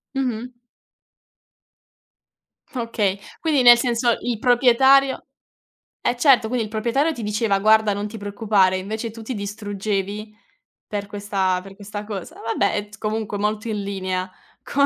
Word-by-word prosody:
Mh-mh. 250 -2 -2 2.2
Okay, 215 -5 -1 0.2
quindi 310 -6 +2
nel 240 -1 +9
senso 235 -1 +1
il 240 -3 -2
proprietario 265 +2 +4 0.8
eh 245 - 0
certo, 250 -3 +5
quindi 240 -1 -1
il 210 - -8
proprietario 240 +8 +1
ti 240 - -7
diceva: 210 -1 +1
"Guarda, 215 +1 +4
non 205 +1 -3
ti 220 +1 -8
preoccupare", 205 -2 +2
invece 220 +4 -4
tu 225 +1 -10
ti 250 +3 -5
distruggevi 205 0 -4 0.5
per 205 -1 -4
questa 200 -3 -1
per 195 +1 -12
questa 205 +1 -7
cosa. 205 -3 -7
Vabbè, 225 -3 0
è 205 0 -3
t 205 - -13
comunque 215 -1 -3
molto 210 +3 -1
in 210 -2 -2
linea 185 -2 -3 0.3
con 280 0 +2
215 Hz, 140 wpm, -22 LUFS, 200-240 Hz, 2.2 s, nel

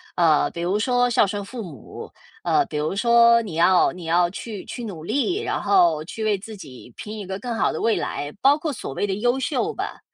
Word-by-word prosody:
呃， 160 -4 +3
比 170 - -6
如 185 +4 0
说 245 +2 +2
孝 240 -4 +3
顺 205 +1 -4
父 235 +4 -7
母， 155 - -10 0.3
呃， - - +2
比 150 - -5
如 150 +5 -1
说 235 +1 +5
你 200 -8 -7
要 175 +2 +4
你 180 -1 -10
要 175 +1 +2
去 205 +2 -7
去 240 - -7
努 175 -8 -7
力， 285 - 0
然 - - -2
后 350 - +3
去 220 +6 -6
为 215 -2 +1
自 215 +3 -10
己 130 - -12
拼 215 +1 -7
一 205 - -6
个 190 0 -4
更 245 +1 -4
好 - - +1
的 - - -4
未 230 - +2
来， 145 0 -4
包 280 +2 +5
括 310 0 -3
所 195 - -6
谓 205 - -1
的 195 - -1
优 240 +5 +1
秀 295 +11 -1
吧。 - - -5
210 Hz, 250 characters per minute, -23 LUFS, 175-245 Hz, 0.3 s, 说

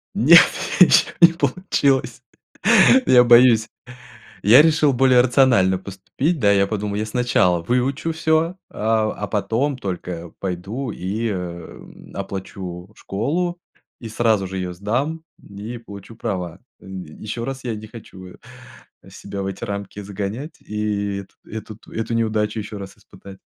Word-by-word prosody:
Нет, - - +8 0.4
ничего - - +6
не 170 0 +8
получилось, 140 -3 0 0.8
я 125 -1 +6
боюсь. 120 -2 +6 0.8
Я 115 +8 +8
решил 155 -2 +3
более 130 0 +4
рационально 120 -7 +3
поступить. 100 - -3
Да, 105 -4 +3
я 100 -1 +3
подумал, 105 -1 -3
я 105 +1 -2
сначала 110 -7 +1
выучу 130 - -1
всё, 160 +2 +1
а, 110 0 0
а 105 - -5
потом 115 +8 -1
только 90 -5 -6
пойду 100 +8 -4
и, 105 +5 -3
эм, 90 -4 -8
оплачу 95 -1 -7
школу, 170 - -3 0.4
и 115 - -7
сразу 110 -3 +1
же 95 +1 -6
ее 90 -1 -4
сдам, 130 - -2 0.2
и 105 +4 -8
получу 105 0 -12
права. 95 -6 -4 0.2
Еще 95 +5 -8
раз 135 +1 -6
я 120 - -2
не 110 +1 -9
хочу, 105 -5 -12
э, 90 - -14 0.7
себя 100 - -7
в - - -3
эти 95 +3 -6
рамки 100 -1 -6
загонять 105 - -6
и 105 -1 -3
эту - - -34
эту 110 -1 -8
т - - -16
эту 115 +1 -3
неудачу 110 -1 -1
еще 105 0 -7
раз 100 -1 -9
испытать. 95 -1 -15
110 Hz, 140 wpm, -21 LUFS, 95-125 Hz, 0.8 s, Нет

